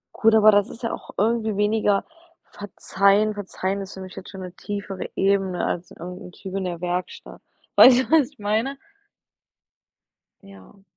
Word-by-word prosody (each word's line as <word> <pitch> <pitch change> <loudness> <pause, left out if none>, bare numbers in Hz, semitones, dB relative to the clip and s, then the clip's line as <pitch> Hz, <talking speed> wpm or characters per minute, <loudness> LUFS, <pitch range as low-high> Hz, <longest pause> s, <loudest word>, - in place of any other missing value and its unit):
Gut, 225 0 +4
aber 215 0 +7
das 205 -1 +2
ist 230 - -12
ja 230 - -2
auch - - -9
irgendwie 220 -1 0
weniger 210 -1 +1 0.5
verzeihen. 205 +1 +1
Verzeihen 200 -1 -4
ist 195 0 -8
für - - -9
mich 185 -1 -10
jetzt 190 - -9
schon 190 -2 -9
'ne 180 -1 -8
tiefere 200 -2 -6
Ebene 195 -2 +1
als 175 +1 -3
irgend'n 180 +1 -9
Typ 190 0 -9
in 195 -1 -2
der 175 -2 -4
Werkstatt. 180 0 -5 0.3
Weißt 255 -1 +8
du, 260 - -3
was 310 -5 +4
ich 285 - -28
meine? 220 +7 -1 1.6
Ja. 195 0 -17
200 Hz, 165 wpm, -23 LUFS, 190-215 Hz, 1.6 s, Weißt